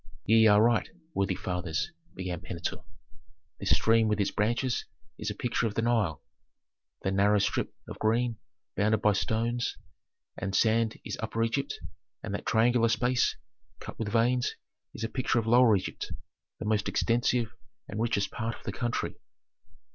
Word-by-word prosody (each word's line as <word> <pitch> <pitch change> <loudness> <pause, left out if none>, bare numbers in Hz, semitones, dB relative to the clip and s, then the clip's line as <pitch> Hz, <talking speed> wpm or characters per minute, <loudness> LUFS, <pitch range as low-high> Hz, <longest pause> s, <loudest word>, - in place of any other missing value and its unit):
"Ye 110 0 +6
are 105 -1 +6
right, 115 -2 +3 0.2
worthy 95 -1 0
fathers," 90 - -2 0.2
began 90 -2 -4
Pentuer: 85 -2 -4 0.8
"this - - -2
stream 115 0 +4
with 105 -1 +1
its 100 - +1
branches 120 +4 0 0.3
is 105 - -2
a 105 - -4
picture 120 +1 0
of 105 - -5
the 115 - +1
Nile; 110 -10 +1 0.8
the 95 - 0
narrow 100 +2 +4
strip 100 - 0 0.2
of - - -8
green 115 +1 +1 0.4
bounded 105 +1 +2
by 105 - +5
stones 115 +4 -1 0.6
and 100 0 -3
sand 110 +1 +3
is - - -4
Upper 115 +1 -1
Egypt, 115 +5 -1 0.4
and 105 - -4
that 100 - -4
triangular 115 +1 +4
space, 125 +2 +2 0.4
cut - - -9
with 110 - -2
veins, 120 +3 +2 0.4
is 115 - -5
a - - +1
picture 125 +1 0
of 115 - +1
Lower 120 -1 +6
Egypt, 95 - -4 0.5
the - - -6
most 105 0 +1
extensive 120 0 +1 0.3
and 105 +3 -4
richest 110 -4 0
part 115 0 -3
of - - -16
the - - -3
country. 120 -1 -2
110 Hz, 160 wpm, -29 LUFS, 105-120 Hz, 0.8 s, Ye